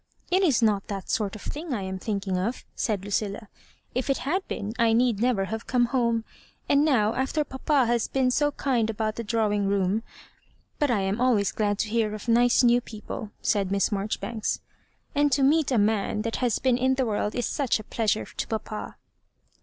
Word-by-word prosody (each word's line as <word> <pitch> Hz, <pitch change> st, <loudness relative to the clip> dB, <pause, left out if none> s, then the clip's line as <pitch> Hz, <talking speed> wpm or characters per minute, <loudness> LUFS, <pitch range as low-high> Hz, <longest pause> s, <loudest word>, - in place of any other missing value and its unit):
" -, -, -34 dB
It 370 Hz, +2 st, +4 dB
is 285 Hz, -10 st, +3 dB
not 205 Hz, -3 st, +2 dB
that 195 Hz, -2 st, -5 dB
sort 210 Hz, -2 st, -1 dB
of 215 Hz, -, -10 dB
thing 300 Hz, -2 st, -4 dB
I 200 Hz, -, -3 dB
am 190 Hz, 0 st, -4 dB
thinking 200 Hz, -2 st, -2 dB
of)" 200 Hz, +7 st, -2 dB
said 200 Hz, -4 st, -1 dB
Lucilla; 205 Hz, +1 st, -2 dB, 0.2 s
" -, -, -36 dB
if 255 Hz, +2 st, -2 dB
it 275 Hz, -, +2 dB
had 360 Hz, +8 st, +1 dB
been, 210 Hz, +1 st, -4 dB
I 230 Hz, -1 st, +4 dB
need 235 Hz, -2 st, +2 dB
never 230 Hz, -5 st, +2 dB
have 220 Hz, +3 st, -5 dB
come 245 Hz, -2 st, +3 dB
home; 235 Hz, -3 st, +2 dB, 0.4 s
and 280 Hz, +1 st, +4 dB
now, 230 Hz, -8 st, +3 dB
after 265 Hz, +5 st, 0 dB
papa 270 Hz, 0 st, +1 dB
has 235 Hz, -1 st, +1 dB
been 260 Hz, -1 st, +1 dB
so* 290 Hz, +3 st, +2 dB
kind 240 Hz, -5 st, 0 dB
about 220 Hz, 0 st, -2 dB
the 235 Hz, -, -4 dB
drawing 210 Hz, -2 st, +1 dB
room; 200 Hz, +2 st, +1 dB, 0.8 s
but 295 Hz, -, +2 dB
I 225 Hz, -5 st, +2 dB
am 195 Hz, +4 st, -1 dB
always 230 Hz, -6 st, +3 dB
glad 205 Hz, -2 st, 0 dB
to 215 Hz, -, -1 dB
hear 215 Hz, -1 st, 0 dB
of 215 Hz, -, -9 dB
nice 240 Hz, +2 st, +4 dB
new 240 Hz, 0 st, +5 dB
people," 220 Hz, -1 st, -7 dB
said 200 Hz, -3 st, +1 dB
Miss 200 Hz, +1 st, +1 dB
Marjoribanks; 215 Hz, +2 st, -2 dB, 0.5 s
"and 290 Hz, -1 st, +2 dB
to 275 Hz, -, +3 dB
meet 300 Hz, +1 st, +4 dB
a 250 Hz, -, +3 dB
man 210 Hz, 0 st, +1 dB
that 225 Hz, 0 st, -2 dB
has 245 Hz, -4 st, +1 dB
been 255 Hz, -2 st, +1 dB
in 260 Hz, +1 st, +2 dB
the 260 Hz, -1 st, +1 dB
world 210 Hz, -1 st, -1 dB
is 245 Hz, -, 0 dB
such 275 Hz, -6 st, 0 dB
a -, -, -7 dB
pleasure 215 Hz, 0 st, 0 dB
to -, -, -5 dB
papa." 215 Hz, -1 st, -5 dB
225 Hz, 210 wpm, -26 LUFS, 210-255 Hz, 0.8 s, new